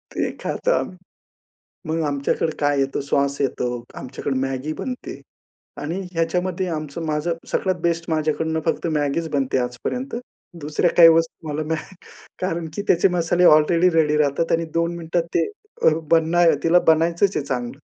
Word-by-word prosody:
ते - - 0
खातो - - -1
आम्ही. 185 - -1 0.9
मग 165 +1 0
आमच्याकडे 140 +3 -1
काय 145 -1 +2
येतं 135 0 0
सॉस 140 0 0
येतो, 125 -3 -2
आमच्याकडे 135 +1 -4
मॅगी 135 +3 -2
बनते 250 +7 -6 0.6
आणि 165 +6 -3
ह्याच्यामध्ये 180 +2 -1
आमचं 155 0 -4
माझं 155 +2 -1 0.2
सगळ्यात 185 -2 0
बेस्ट 170 0 0
माझ्याकडून 160 +1 0
फक्त 165 +1 0
मॅगीच 150 +2 0
बनते 135 -3 0
आजपर्यंत. 125 - -3 0.5
दुसऱ्या 150 +4 +1
काही 165 -1 +10
वस्तू 165 0 +1
मला 150 +1 -2
नाही 160 +4 -4 0.5
कारण 170 -3 -2
की - - -2
त्याचे 175 +2 +4
मसाले 175 0 +1
अलरेडी 165 +4 +5
रेडी 150 -2 +3
राहतात 150 +2 +1
आणि 165 0 +1
2 170 +1 0
मिनिटात 165 0 -1
ते - - +3 0.4
अ, - - +6 0.2
बनाय 165 0 +4
तिला 170 +2 +5
बनायचंच 170 +5 +3
आहे 140 - -2
चांगलं 125 +1 -4
160 Hz, 150 wpm, -22 LUFS, 145-170 Hz, 0.9 s, काही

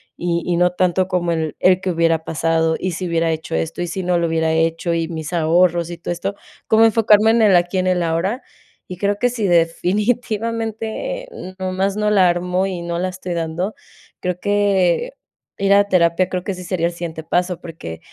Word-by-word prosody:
y 170 -1 -1
y 175 -1 +1
no 180 +1 +3
tanto 185 0 +1
como 175 -2 -1
el 160 -2 -2
el 185 0 +4
"¿que 190 - -2
hubiera 165 -1 +1
pasado? 165 0 0
¿Y 185 - -2
si 180 +2 -4
hubiera 165 -1 +1
hecho 160 0 -5
esto 80 - -3
y 175 - -3
si 190 +3 -4
no 180 0 +1
lo 170 - +1
hubiera 160 0 0
hecho 165 +1 0
y 165 -1 -1
mis 160 0 -6
ahorros?, 170 +1 +2
y 175 - -6
todo 170 - -5
esto", 190 +4 -3 0.3
como 220 +1 +5
enfocarme 220 -1 +4
en 230 0 +3
el 205 -4 +5
aquí, 175 +2 +2
en 185 - 0
el 180 -1 +1
ahora. 170 +9 -1 0.5
Y 180 - -6
creo 200 +2 -1
que 245 - +3
sI, 230 -4 -2
definitivamente 220 - -1 0.3
nomás 190 +2 -1
no 210 0 +1
la 190 -4 +4
armo 180 +2 0
y 185 -3 -4
no 170 0 -3
la 185 - -1
estoy 185 -1 -6
dando, 170 +5 -3 0.5
creo 180 -1 -2
que 205 - +1 0.5
ir 195 0 +3
a 200 0 +6
terapia 180 0 +2
creo 180 -1 -3
que 200 - -2
sí 180 0 -8
sería 175 -2 -1
el 175 - -5
siguiente 170 -2 -6
paso, 180 +1 0
porque 155 - -8
180 Hz, 205 wpm, -19 LUFS, 170-195 Hz, 0.5 s, a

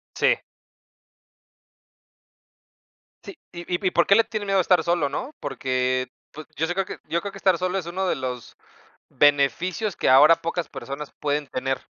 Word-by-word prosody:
Sí. - - +2 2.8
Sí, 395 - -11
y 175 - -7
y 185 +1 -1
y - - +1
¿por 170 - +3
qué 200 - +5
le 230 +1 +4
tiene 215 -2 -4
miedo 195 -1 +1
a 190 - +5
estar 180 +1 +3
solo?, 170 -4 +1
¿no? 255 - -5
Porque, 130 -2 -1 0.2
pues, 155 +1 -10
yo 160 - 0
si 175 - -2
creo 195 0 -1
que - - -8
yo 170 - -1
creo 200 - -5
que 195 - -11
estar 190 -3 +2
solo, 185 +2 -1
es 180 - -4
uno 185 +3 -3
de - - +1
los 125 -2 -6 0.5
beneficios 145 - +1
que - - 0
ahora 150 +5 +7
pocas 165 -1 -3
personas 140 +1 -7
pueden 145 -1 -1
tener. 135 +1 -3
170 Hz, 180 wpm, -24 LUFS, 140-190 Hz, 2.8 s, ahora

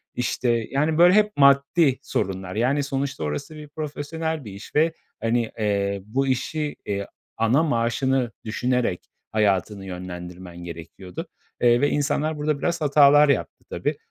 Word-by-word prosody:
İşte, 125 0 -1 0.2
yani, 150 +3 +1
böyle 175 +2 +7
hep 210 +1 +4
maddi 140 +1 +4
sorunlar. 95 -1 -3
Yani, 130 +6 +1
sonuçta 135 - -3
orası 150 - -5
profesyonel 155 0 -4
bir 105 - -7
iş 100 +2 -11
ve, 160 +2 +3 0.3
hani, 115 0 0
eee, 100 -2 0
bu 135 +6 -1
işi, 145 +4 -1
eee, 100 -1 -3 0.3
ana 115 +7 +3
maaşını 125 -2 +1
düşünerek 125 -3 -1 0.2
hayatını 100 -1 +1
yönlendirmen 90 -1 -8
gerekiyordu, 85 - -8 0.3
eee, 120 +1 +5
ve 145 - +3
insanlar 150 +1 0
burada 150 -1 -1
biraz 170 +2 -1
hatalar 145 0 +6
yaptı 140 - -1
tabii. - - -2
130 Hz, 135 wpm, -24 LUFS, 100-150 Hz, 0.3 s, böyle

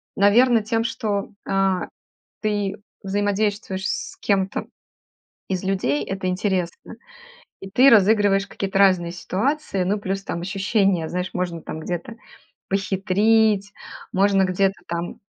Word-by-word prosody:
Наверно, 225 +3 +4
тем, 225 +1 0
что, 210 -3 -2 0.2
а, 195 -1 +1 0.5
ты 205 -2 -1 0.3
взаимодействуешь 205 -1 -1
с - - -4
кем-то 195 -1 0 0.8
из 190 0 -2
людей, 145 -7 0
это 190 -1 -4
интересно, 185 -2 -2 0.7
и 195 - -8
ты 255 +7 +6
разыгрываешь 205 -2 +4
какие-то 195 -1 -3
разные 185 -3 +4
ситуации. 195 - -1
Ну, 200 +3 0
плюс 195 0 -3
там 170 - -4
ощущение, 195 -2 +1
знаешь, 180 +2 -3
можно 175 -2 -3
там 155 - -6
где-то 175 +7 -5 0.5
похитрить, 200 +2 +2 0.4
можно 195 0 +3
где-то 190 +1 +1
там 170 +1 -4
195 Hz, 115 wpm, -22 LUFS, 185-205 Hz, 0.8 s, ты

